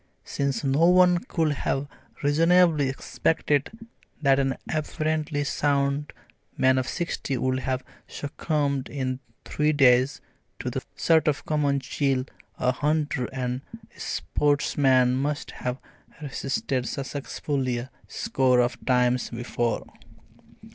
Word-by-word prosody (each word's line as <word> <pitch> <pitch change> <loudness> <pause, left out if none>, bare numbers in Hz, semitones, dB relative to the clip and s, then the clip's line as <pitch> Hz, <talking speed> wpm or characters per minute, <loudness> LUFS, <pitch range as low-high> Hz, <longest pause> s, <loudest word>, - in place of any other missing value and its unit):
since 140 -4 -2
no 140 +5 +3
one 180 0 +5
could 160 -2 0
have 140 0 -1 0.4
reasonably 160 0 +4
expected 145 +1 0 0.5
that 140 -2 +4
an 135 -1 +1 0.2
apparently 155 -1 -1
sound 140 0 0 0.5
man 130 0 +4
of 130 - -2
sixty 170 -6 -2
would 130 +1 0
have 130 0 -2 0.2
succumbed 145 -2 -2
in 130 -2 -3 0.3
three 150 +1 +1
days 130 -2 +4 0.4
to - - -4
the - - -3
sort 160 -1 +3
of 150 -2 0
common 145 -2 +1
chill 135 -1 0 0.3
a 125 - +2
hunter 145 -1 0
and 125 -1 -3 0.3
sportsman 135 -3 +2
must 145 +2 -2
have 125 0 -4 0.4
resisted 135 -3 -2
successfully 135 -2 -3
a 120 +3 -6 0.2
score 130 -2 +1
of 120 0 0
times 125 -1 +2
before. 120 0 -2
140 Hz, 115 wpm, -26 LUFS, 130-150 Hz, 0.5 s, one